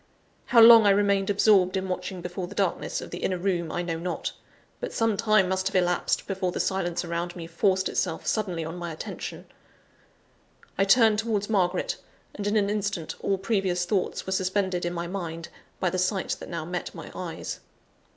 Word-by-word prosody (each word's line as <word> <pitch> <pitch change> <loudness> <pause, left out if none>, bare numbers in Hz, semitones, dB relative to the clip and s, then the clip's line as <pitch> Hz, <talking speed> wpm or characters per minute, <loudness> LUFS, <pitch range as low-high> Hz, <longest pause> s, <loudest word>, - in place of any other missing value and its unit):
How 235 - +4
long 225 -1 +9
I - - +7
remained 200 -1 +3
absorbed 200 -2 +4
in 190 0 -2
watching 180 0 -4
before 180 +1 -5
the 200 - -11
darkness 195 -4 -1
of - - -9
the 175 - -5
inner 185 - -1
room, 175 -3 -1
I 175 - -2
know 165 -2 -3
not 180 +1 -3 0.5
but - - -4
some 225 -2 +1
time 215 -2 +3
must 190 0 0
have 195 - -4
elapsed 180 -1 +1
before 190 -2 -2
the - - -4
silence 175 -2 -1
around 170 +1 -3
me 170 -2 -6
forced 190 +3 +1
itself 170 -3 -2
suddenly 180 -7 -1
on 165 +2 -6
my 175 -1 -5
attention. 155 - -7 1.3
I 195 - +2
turned 220 +1 +5
towards 220 -2 -1
Margaret; 185 -3 +1 0.4
and, 205 0 -4
in 205 - +1
an 200 -1 +2
instant, 200 -5 -2
all 195 - 0
previous 190 -3 0
thoughts 190 0 -1
were 190 - -4
suspended 190 -1 0
in 175 - -2
my 170 0 -3
mind, 170 -3 -5 0.3
by 180 - +1
the 185 - -1
sight 185 +1 0
that - - -9
now 165 -2 -4
met 180 +1 -5
my - - -9
eyes. - - -5
190 Hz, 190 wpm, -26 LUFS, 175-200 Hz, 1.3 s, long